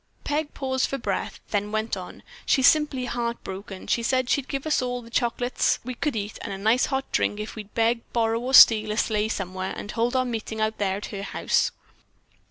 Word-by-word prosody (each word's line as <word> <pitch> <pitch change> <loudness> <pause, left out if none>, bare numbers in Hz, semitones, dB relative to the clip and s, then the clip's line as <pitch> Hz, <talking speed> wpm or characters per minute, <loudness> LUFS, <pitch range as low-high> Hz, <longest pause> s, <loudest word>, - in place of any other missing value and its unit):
Peg 295 0 -2
paused 260 -1 -1
for 275 - -2
breath, - - -3
then 205 0 -1
went 215 +1 -1
on: - - -9 0.2
"She's 265 - +3
simply 295 -4 +3
heart 235 -1 -3
broken; 190 0 -7
she 235 - +1
said 255 +1 +1
she'd 280 -2 +1
give 275 0 -4
us 310 -3 +2
all 245 -1 -3
the 230 - -14
chocolates 245 +1 +1
we 255 +1 -5
could 285 +2 -2
eat 205 0 -4
and - - -5
a 195 - -4
nice 220 +6 +2
hot 270 -1 -2
drink 205 - 0
if 215 +1 -6
we'd 210 -2 -10
beg, 230 +1 +2
borrow 225 -1 +1
or 255 +3 +1
steal 215 -3 +8
a 215 - -3
sleigh 215 -1 +1
somewhere 190 -2 -3
and 205 - -6
hold 240 +2 0
our 255 0 +2
meeting 225 -2 -4
out 215 0 -1
there 195 -2 0
at 205 - -6
her 200 - -4
house." 200 - +1
230 Hz, 215 wpm, -25 LUFS, 215-255 Hz, 0.2 s, steal